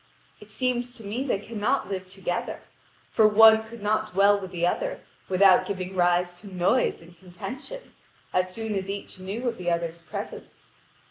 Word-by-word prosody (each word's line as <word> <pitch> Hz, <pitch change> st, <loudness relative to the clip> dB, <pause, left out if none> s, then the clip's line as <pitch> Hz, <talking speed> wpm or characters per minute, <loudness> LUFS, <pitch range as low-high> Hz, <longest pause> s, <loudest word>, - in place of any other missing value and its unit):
It 210 Hz, -, -14 dB
seems 245 Hz, +2 st, -1 dB
to 225 Hz, -, -12 dB
me 215 Hz, +6 st, -3 dB
they 260 Hz, -7 st, 0 dB
cannot 210 Hz, +1 st, -1 dB
live 190 Hz, -2 st, -4 dB
together; 185 Hz, -2 st, -4 dB, 0.5 s
for 220 Hz, -, +5 dB
one 220 Hz, +1 st, +7 dB
could 220 Hz, -1 st, -11 dB
not 215 Hz, 0 st, 0 dB
dwell 200 Hz, +2 st, +5 dB
with 190 Hz, -2 st, -7 dB
the 175 Hz, -2 st, -1 dB
other, -, -, -1 dB, 0.3 s
without 190 Hz, 0 st, +5 dB
giving 190 Hz, -1 st, -4 dB
rise 175 Hz, 0 st, +2 dB
to 205 Hz, -, -11 dB
noise 180 Hz, +2 st, +1 dB
and 170 Hz, +1 st, -16 dB
contention, 255 Hz, -, -9 dB, 0.4 s
as 185 Hz, 0 st, +1 dB
soon 220 Hz, +2 st, -4 dB
as 195 Hz, -1 st, -3 dB
each 200 Hz, -1 st, -6 dB
knew 205 Hz, +7 st, -4 dB
of 235 Hz, -, -2 dB
the 175 Hz, -1 st, -1 dB
other's 170 Hz, 0 st, -2 dB
presence. 160 Hz, -1 st, -8 dB
200 Hz, 175 wpm, -26 LUFS, 180-220 Hz, 0.5 s, one